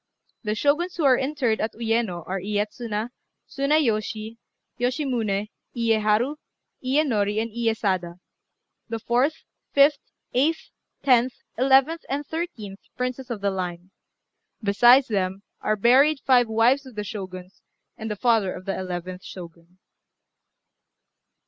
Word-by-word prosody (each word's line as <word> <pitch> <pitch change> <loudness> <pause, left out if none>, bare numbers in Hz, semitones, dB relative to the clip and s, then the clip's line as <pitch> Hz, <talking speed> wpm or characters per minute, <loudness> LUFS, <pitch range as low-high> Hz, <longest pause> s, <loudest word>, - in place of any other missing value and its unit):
The 215 -2 -2
Shoguns 300 +9 +1
who 335 - -2
are 265 -2 +6
interred 265 -4 0
at 220 0 -2
Uyéno 225 -6 -1
are 190 +1 -2
Iyétsuna, 210 +3 -3 0.4
Tsunayoshi, 230 -6 0 0.4
Yoshimuné, 240 -6 -1 0.2
Iyéharu, 225 +4 +2 0.5
Iyénori, 245 -7 +1
and 225 +1 -2
Iyésada, 205 -6 -1 0.7
the 225 - -2
fourth, 245 +7 0 0.3
fifth, 280 +1 +5 0.3
eighth, 300 +6 0 0.3
tenth, 250 -1 +4 0.2
eleventh, 270 +6 +4
and 285 +2 -2
thirteenth 250 - -5 0.2
Princes 255 +1 -3
of 225 -4 -4
the 200 0 +1
Line. 180 -1 -5 0.7
Besides 240 +6 +6
them, 195 -2 -2 0.2
are 215 - +1
buried 265 +8 +4
five 250 -3 +5
wives 240 +5 +2
of 255 - -13
the 210 - -3
Shoguns, 185 -2 -8 0.3
and 220 - -6
the 210 - -2
father 220 -4 +2
of 185 - -10
the 195 - -2
eleventh 180 0 -5
Shogun. 170 0 -11
225 Hz, 120 wpm, -24 LUFS, 200-265 Hz, 0.7 s, are